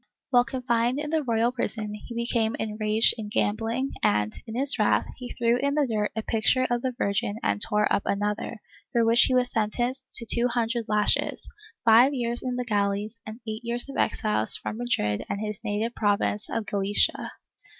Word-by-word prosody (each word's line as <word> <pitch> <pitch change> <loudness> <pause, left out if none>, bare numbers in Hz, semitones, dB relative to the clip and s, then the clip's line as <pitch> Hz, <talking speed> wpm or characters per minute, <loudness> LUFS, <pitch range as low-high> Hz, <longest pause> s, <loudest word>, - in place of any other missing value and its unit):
While 245 -1 +5
confined 240 0 0
in 300 +1 -4
the 320 -1 +2
royal 235 -2 +1
prison 220 -4 -3
he 220 +3 -9
became 235 -1 0
enraged 215 +1 +1
in 210 -1 -5
gambling 225 +6 -1
and, 105 +1 +1
in 225 - -6
his 275 +3 +4
wrath, - - +3
he 250 -1 -8
threw 235 0 +2
in 280 +2 0
the 300 -1 +3
dirt 215 -4 -1
a 220 - -2
picture 230 +4 +2
of 240 0 +1
the 255 -1 -2
Virgin 205 0 -1
and 100 0 0
tore 210 0 +2
up - - +2
another, 210 +2 -2 0.3
for 235 -1 +2
which 230 +1 +5
he 255 - +1
was 250 -1 +3
sen 215 -2 +1
tenced 255 +3 -3
to 235 - +1
two 235 +2 +4
hundred 235 -1 -1
lashes, 210 -1 +1 0.4
five 240 +5 +6
years 240 -1 -2
in 250 -1 -3
the 250 0 -3
galleys 205 +1 -1
and 220 +3 -8
eight 220 +1 -5
years 240 +2 -1
of 275 - -7
exile 210 - 0
from 220 - -3
Madrid 105 - -1
and 200 - -2
his 215 0 -5
native 220 +2 -2
province 205 -1 0
of 225 - -2
Galicia. 200 0 0
230 Hz, 190 wpm, -26 LUFS, 210-245 Hz, 0.4 s, five